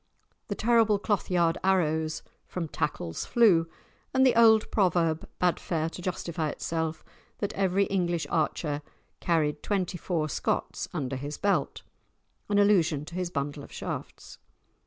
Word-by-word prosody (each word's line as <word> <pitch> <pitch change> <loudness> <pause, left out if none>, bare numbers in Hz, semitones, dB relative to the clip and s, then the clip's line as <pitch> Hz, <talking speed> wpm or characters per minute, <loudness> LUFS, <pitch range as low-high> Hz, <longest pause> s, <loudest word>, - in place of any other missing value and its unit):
The - - -3
terrible 225 -2 +3
cloth 205 0 -1
yard 170 -2 +2
arrows 160 -4 +1 0.2
"from 175 -3 -4
tackles 85 - -3
flew," 190 -9 +4 0.5
and 265 0 +5
the 255 - +5
old 220 -2 +5
proverb 170 -5 +1
bade 180 -1 +1
fair 160 -1 -2
to 180 - -8
justify 170 -3 -2
itself, 160 +1 -3 0.3
that 205 0 -3
every 195 0 +2
English 175 -5 0
archer 150 -2 0 0.4
carried 155 -3 +1
twenty 185 -3 -1
four 160 -3 -1
Scots - - -2
under 135 -1 -3
his 145 +2 -5
belt—an 205 0 -3
allusion 175 -8 +3
to 170 - -11
his 180 0 -2
bundle 145 -2 -3
of - - -12
shafts. - - -7
175 Hz, 135 wpm, -28 LUFS, 155-200 Hz, 0.5 s, and